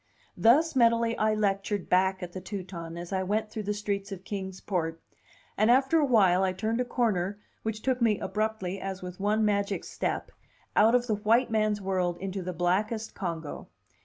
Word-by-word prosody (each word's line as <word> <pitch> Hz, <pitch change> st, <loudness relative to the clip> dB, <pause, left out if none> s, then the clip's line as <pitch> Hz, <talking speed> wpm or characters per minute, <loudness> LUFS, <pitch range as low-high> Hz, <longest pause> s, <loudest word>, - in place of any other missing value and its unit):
Thus 295 Hz, +8 st, +4 dB
mentally 230 Hz, -1 st, +3 dB
I 215 Hz, 0 st, +2 dB
lectured 200 Hz, -1 st, -1 dB
back 190 Hz, +1 st, +2 dB
at 175 Hz, -1 st, -7 dB
the 185 Hz, -, -6 dB
Teuton 180 Hz, -3 st, -6 dB
as 175 Hz, +2 st, -6 dB
I 190 Hz, -, +1 dB
went 215 Hz, +3 st, -1 dB
through 220 Hz, -, -4 dB
the -, -, +2 dB
streets 200 Hz, -1 st, -3 dB
of 190 Hz, -1 st, -7 dB
Kings 190 Hz, -1 st, -5 dB
Port; 165 Hz, -4 st, -2 dB, 0.6 s
and 215 Hz, +2 st, +3 dB
after 265 Hz, +6 st, +4 dB
a 300 Hz, -, +3 dB
while 195 Hz, -8 st, +4 dB
I 185 Hz, -1 st, +1 dB
turned 225 Hz, +5 st, -1 dB
a -, -, -1 dB
corner 205 Hz, -6 st, 0 dB, 0.2 s
which 220 Hz, -1 st, -4 dB
took 260 Hz, -1 st, 0 dB
me 220 Hz, -3 st, +3 dB
abruptly, 210 Hz, -3 st, -2 dB
as 195 Hz, -1 st, -5 dB
with 180 Hz, +1 st, -7 dB
one 210 Hz, +2 st, +2 dB
magic 200 Hz, -1 st, 0 dB
step, -, -, -3 dB, 0.4 s
out 225 Hz, +3 st, +5 dB
of 245 Hz, -1 st, +2 dB
the 225 Hz, -, 0 dB
white 225 Hz, +4 st, +2 dB
man's 215 Hz, -1 st, +1 dB
world 185 Hz, -2 st, 0 dB
into 190 Hz, +1 st, -4 dB
the 180 Hz, 0 st, -4 dB
blackest 200 Hz, +6 st, -1 dB
Congo. 165 Hz, -5 st, -5 dB
205 Hz, 190 wpm, -28 LUFS, 185-220 Hz, 0.6 s, out